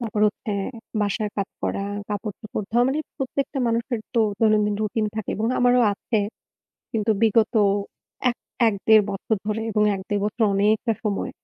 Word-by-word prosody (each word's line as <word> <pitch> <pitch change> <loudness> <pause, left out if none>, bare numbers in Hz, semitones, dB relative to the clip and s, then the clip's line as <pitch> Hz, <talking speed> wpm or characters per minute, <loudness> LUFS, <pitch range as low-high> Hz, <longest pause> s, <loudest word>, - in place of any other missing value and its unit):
তারপর 220 -3 -2
হচ্ছে 210 0 -3 0.5
বাসার 205 +1 0
কাজ 200 -1 -1
করা, 195 - -1 0.2
কাপড়-চোপড় 210 0 -4
ধোয়া। 240 +2 +4
মানে 275 +3 0 0.2
প্রত্যেকটা 275 +1 -2
মানুষের 235 +1 -1 0.2
তো 230 - +4 0.2
দৈনন্দিন 215 -2 +3
routine 215 0 0
থাকে 220 - -3
এবং 220 - 0
আমারও 245 0 +4
আছে। 220 +2 -1 0.7
কিন্তু 220 -1 0
বিগত 225 +1 +3 0.8
এক 240 - -6 0.3
এক-দেড় 215 +1 +4
বছর 200 +3 -1
ধরে 215 +1 -1
এবং 210 0 +2
১-১.৫ 200 +2 -2
বছর 215 +3 -3
অনেকটা 215 +3 +2
সময়। 205 -2 -1
215 Hz, 145 wpm, -24 LUFS, 205-230 Hz, 0.8 s, ধোয়া